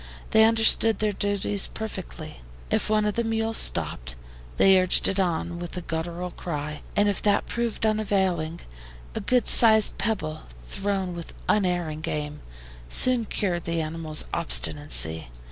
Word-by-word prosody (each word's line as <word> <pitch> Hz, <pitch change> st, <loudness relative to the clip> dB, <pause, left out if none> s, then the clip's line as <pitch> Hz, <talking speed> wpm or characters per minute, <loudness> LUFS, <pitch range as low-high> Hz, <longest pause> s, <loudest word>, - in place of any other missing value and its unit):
They 220 Hz, 0 st, +6 dB
understood 225 Hz, 0 st, +4 dB
their 215 Hz, -1 st, 0 dB
duties 205 Hz, 0 st, -1 dB
perfectly. 190 Hz, -7 st, -8 dB, 0.3 s
If -, -, 0 dB
one 215 Hz, -1 st, +2 dB
of 210 Hz, -, 0 dB
the 235 Hz, -, -1 dB
mules 225 Hz, 0 st, 0 dB
stopped, 75 Hz, -7 st, -1 dB, 0.4 s
they 190 Hz, -1 st, +6 dB
urged 185 Hz, -, +3 dB
it 195 Hz, -, 0 dB
on 175 Hz, -1 st, -1 dB
with 175 Hz, +1 st, -7 dB
a -, -, -3 dB
guttural 170 Hz, +2 st, -5 dB
cry, 150 Hz, -3 st, -6 dB
and 205 Hz, 0 st, +3 dB
if 205 Hz, -, -1 dB
that 205 Hz, -1 st, +1 dB
proved 235 Hz, -1 st, -3 dB
unavailing, 190 Hz, -6 st, 0 dB, 0.5 s
a -, -, -3 dB
good 250 Hz, -1 st, +1 dB
sized 220 Hz, -2 st, +5 dB
pebble, 155 Hz, -8 st, -2 dB, 0.2 s
thrown 195 Hz, -2 st, -3 dB
with 170 Hz, -1 st, -9 dB
unerring 175 Hz, -6 st, 0 dB
aim, 150 Hz, 0 st, -4 dB, 0.5 s
soon 250 Hz, -, +3 dB
cured 180 Hz, -5 st, -3 dB
the 170 Hz, 0 st, -2 dB
animal's 155 Hz, -1 st, -1 dB
obstinacy. 145 Hz, -, +1 dB
185 Hz, 145 wpm, -25 LUFS, 160-215 Hz, 0.5 s, They